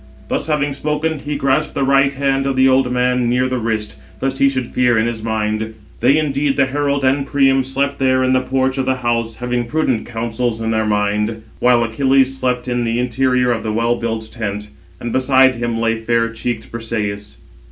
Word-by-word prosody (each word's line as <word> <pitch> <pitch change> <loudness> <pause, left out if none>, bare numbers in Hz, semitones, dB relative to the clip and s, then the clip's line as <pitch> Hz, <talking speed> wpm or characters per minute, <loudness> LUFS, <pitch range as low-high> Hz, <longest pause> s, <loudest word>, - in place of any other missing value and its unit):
Thus - - -2
having 145 -2 0
spoken, 150 +2 -2
he 145 +1 -4
grasped 140 +3 0
the 140 - 0
right 135 0 +3
hand 135 0 0
of 135 - 0
the 130 0 +4
old 130 -1 +3
man 125 -1 +1
near 125 +1 +2
the 130 -1 -2
wrist, 110 -7 -3 0.2
lest 135 0 -2
he 140 - +5
should 130 -2 -2
fear 125 -1 +1
in 110 - +2
his 115 -1 -3
mind. 110 0 -2 0.2
They 130 +5 +4
indeed, 145 -2 0
the 140 - +4
herald 140 0 -1
and 135 +2 +2
Priam, 135 -1 +2
slept 140 +2 -2
there 130 -1 +2
in 130 0 +2
the 130 - +3
porch 130 +1 -1
of 130 - -1
the 130 - +2
house, 115 -1 0
having 125 0 -2
prudent 130 -3 -1
counsels 115 0 -2
in 115 0 -2
their 110 -1 0
mind; 105 +1 0 0.2
while 120 -1 +4
Achilles 135 +3 +2
slept 125 -1 -1
in 120 -1 0
the 115 0 -1
interior 125 0 +1
of 115 -2 -1
the 110 -1 -3
well 115 +2 +1
built 115 -2 -4
tent; 105 -2 -5 0.3
and 120 - -5
beside 130 0 +4
him 120 -1 -2
lay 115 0 +1
fair 115 +1 0
cheeked 115 0 -5
Brisëis. 105 -3 -4
125 Hz, 205 wpm, -18 LUFS, 115-135 Hz, 0.3 s, he